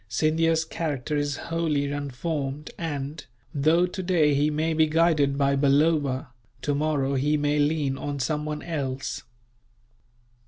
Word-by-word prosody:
Scindia's 160 +6 +2
character 150 -3 -3
is 145 -1 -1
wholly 155 -4 -1
unformed 145 +1 -3
and, 145 -2 -4 0.3
though 155 +5 +3
today 180 -5 +1
he 145 +2 +2
may 155 +2 0
be 160 0 +3
guided 155 -3 +2
by 140 -1 +2
Balloba, 140 -1 +2 0.3
tomorrow 145 -1 0
he 145 +3 +2
may 145 0 +1
lean 145 -2 +1
on 145 -1 -4
someone 150 +2 -2
else. 140 -5 -3
150 Hz, 120 wpm, -26 LUFS, 140-160 Hz, 0.3 s, though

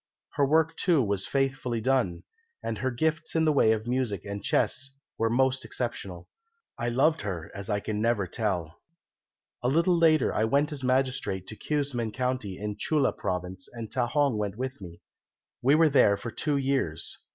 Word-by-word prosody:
Her 140 -2 +2
work, 160 +2 +3
too, 165 -7 +3
was 100 -2 -1
faithfully 135 -3 0
done, 120 -7 0 0.4
and - - -3
her 130 - 0
gifts 155 +7 -1
in 160 0 +3
the 155 - +4
way 110 -6 +4
of 110 0 0
music 120 -6 -1
and 100 0 -5
chess 130 +5 0 0.3
were 115 - +1
most 130 +2 +2
exceptional. 95 -8 -5 0.5
I 120 -1 -2
loved 145 +7 +2
her 90 -6 -5
as 100 0 -6
I 105 -1 0
never 110 -1 +1
can 90 - -16
tell. 90 -7 -2 0.8
"A 125 - 0
little 170 +6 +3
later 160 -4 +4
I 110 - +2
went 140 +6 +2
as 140 -3 -6
magistrate 130 -7 0
to 110 - -7
Keumsan 135 -6 -2
county 125 -7 -2
in 105 0 -4
Chulla 145 +3 +1
Province, 90 0 -4
and 115 -2 -7
Ta 125 -2 0
hong 140 -3 +1
went 105 -1 -3
with 130 -2 -4
me. 85 -3 -11 0.6
We 135 +4 +5
were 160 +1 +5
there 105 -8 +5
for 115 +3 -6
two 150 +3 -1
years. 135 - -1
125 Hz, 180 wpm, -28 LUFS, 105-140 Hz, 0.8 s, We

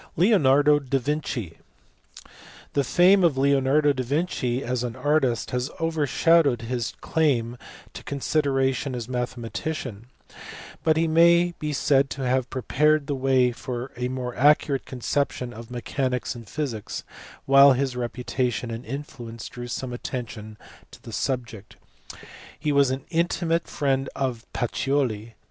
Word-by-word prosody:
Leonardo 150 - +4
da 135 -1 -1
Vinci. 125 - -3 1.1
The 140 - +2
fame 180 +7 +5
of 160 -6 +3
Leonardo 140 +2 +3
da 130 - -3
Vinci 130 -2 -1
as 125 0 -2
an 120 -2 -4
artist 145 -6 +1
has 125 +2 -1
overshadowed 160 -4 +2
his 120 -1 -3
claim 125 -7 +1 0.4
to - - -9
consideration 135 -2 0
as 120 -2 -5
a - - -9
mathe 125 0 -2
matician, 120 -2 -5 0.8
but 160 -1 +3
he 165 +1 +2
may 170 +2 +5
be 150 0 -2
said 140 -1 +2
to 135 - -5
have 130 0 0
prepared 150 +3 +1
the 145 - -2
way 130 -2 +2
for 125 +1 -6
a 125 0 -2
more 125 -1 -4
accurate 145 +1 +3
conception 125 -1 -2
of 115 0 -10
mechanics 125 +1 -2
and 115 -4 -11
physics, 130 -9 -4 0.4
while 135 0 +7
his 130 0 -1
reputation 125 0 -2
and 115 +2 -5
influence 120 -4 -7
drew 120 0 -7
some 125 +1 -4
attention 110 -3 -6 0.3
to - - -14
the 115 - -11
sub 125 +1 -1
ject; 110 -3 -13 0.8
he 150 0 0
was 140 -2 +4
an 130 +1 -3
intimate 170 0 0
friend 135 -2 -1
of 125 -4 -3
Pacioli. 120 -3 -1
130 Hz, 140 wpm, -25 LUFS, 120-145 Hz, 1.1 s, while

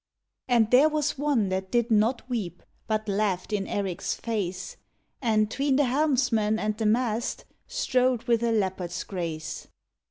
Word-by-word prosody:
And 235 -3 +3
there 270 +5 +6
was 300 -2 -1
one 275 -9 +1
that 190 0 -2
did 235 +1 +1
not 225 +4 +2
weep, 205 -9 -4 0.2
But 215 0 -1
laughed 200 -1 -1
in 195 -2 -1
Erik 195 -4 -3
s - - -1
face, 195 -5 -4 0.4
And 215 -3 +2
tween 275 0 +1
the 290 - +4
helmsman 250 -6 +2
and 215 -1 -1
the 220 0 0
mast 230 0 0 0.2
Strode 250 -2 +1
with 235 -1 +2
a 235 -1 +1
leopard 190 -5 -1
s 175 +2 -4
grace. 165 -5 -5
220 Hz, 160 wpm, -27 LUFS, 195-250 Hz, 0.4 s, there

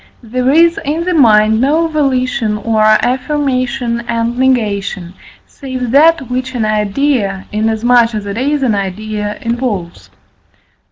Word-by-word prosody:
There 250 +3 -1
is 335 +4 +4
in 310 +4 -2
the 365 +1 -1
mind 220 -6 +4
no 310 +5 +2
volition 255 -8 -1
or 220 +1 -1
affirmation 255 +1 0
and 235 0 -1
negation, 205 -8 -1 0.3
save 255 -4 -6
that 320 +4 +4
which 255 +1 -4
an 225 -3 0
idea, 210 -1 -1
inasmuch 225 +2 +2
as 210 -1 -4
it 200 0 -5
is 280 +4 -1
an 240 -4 +1
idea, 210 +2 -4
involves. 230 -7 -4
240 Hz, 125 wpm, -14 LUFS, 215-265 Hz, 0.3 s, is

